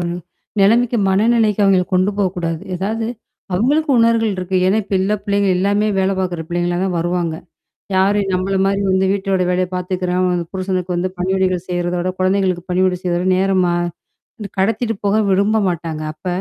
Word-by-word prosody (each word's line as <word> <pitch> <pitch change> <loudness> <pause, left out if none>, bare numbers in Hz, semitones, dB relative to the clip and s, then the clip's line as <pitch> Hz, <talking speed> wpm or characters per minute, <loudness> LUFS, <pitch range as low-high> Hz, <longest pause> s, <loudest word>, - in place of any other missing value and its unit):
ஒரு 170 0 -2 0.5
நிலைமைக்கு 230 +4 +3
மனநிலைக்கு 215 +1 +2
அவங்கள 190 -2 +4
கொண்டு 185 +2 +3
போக்கூடாது. 175 -4 -1 0.2
ஏதாவது 220 +5 -2 0.5
அவங்களுக்கு 285 - +1
உணவுர்கள் 230 -1 +3
இருக்கு. 185 +1 -2
ஏன்னா, 195 +4 +3
இப்ப 200 - -3
உள்ள 195 +2 0
பிள்ளைங்க 200 -1 +1
எல்லாமே 205 +3 +1
வேல 190 +1 +2
பாக்குற 175 -3 -2
பிள்ளைங்களா 175 0 -1
தான் 185 -2 -1
வருவாங்க. 175 -1 -1 0.6
யாரு 195 +2 +3
நம்மள 185 +2 0
மாரி 195 +1 +1
வந்து 190 0 +2
வீட்டோட 195 -1 0
வேலைய 180 0 +1
பார்த்துக்கிறாங்ளோ 180 0 -1
வந்து 175 -1 -2
புருஷனுக்கு 185 -1 -2
வந்து 180 +2 -1
பணிவிடைகள் 185 -1 0
செய்றத 175 0 -1
விட, 180 +1 -1
குழந்தைகளுக்கு 185 -2 +1
பணிவிடை 185 0 +2
செய்றத 175 -1 0
விட 185 - 0
நேரமா 185 -2 +2 0.6
வந்து 210 -4 -7
கடத்திட்டு 225 +4 0
போக 200 - +2
விரும்ப 200 +3 +2
மாட்டாங்க. 165 -2 -4
அப்ப 155 - -18
190 Hz, 160 wpm, -18 LUFS, 180-200 Hz, 0.6 s, அவங்கள